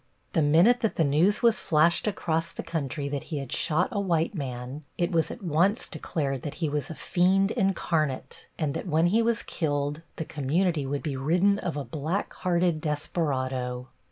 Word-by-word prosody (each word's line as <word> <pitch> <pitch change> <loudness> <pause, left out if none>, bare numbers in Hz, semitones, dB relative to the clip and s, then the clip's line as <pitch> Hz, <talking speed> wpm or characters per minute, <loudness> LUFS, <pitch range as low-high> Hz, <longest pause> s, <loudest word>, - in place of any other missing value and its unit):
The 160 - +3
minute 170 +12 +5
that 225 - 0
the 165 - +2
news 160 - +2
was 230 -2 +4
flashed 165 +5 +3
across 165 -5 -1
the - - -6
country 145 -3 -3
that 140 -1 -4
he 155 - -2
had 135 -3 -5
shot 165 +4 +1
a 210 - -1
white 170 -2 +1
man 130 -2 -5
it 175 -1 0
was 165 -2 +2
at 230 - -8
once 180 +6 +2
declared 140 -4 -3
that 145 - -5
he 160 -3 -1
was 145 -2 -2
a 160 - -6
fiend 190 +5 +2
incarnate, 165 - -1
and 150 -4 -1
that - - -4
when 160 0 +3
he 210 +7 +3
was 230 0 +1
killed 145 -1 -2
the 160 - -4
community 150 +1 0
would 140 +1 -2
be 145 -4 -2
ridden 180 +9 +2
of 165 -4 -3
a 140 - -3
black 155 - -3
hearted 175 -3 +1
desperado. 130 -5 -2
160 Hz, 185 wpm, -27 LUFS, 145-180 Hz, -, minute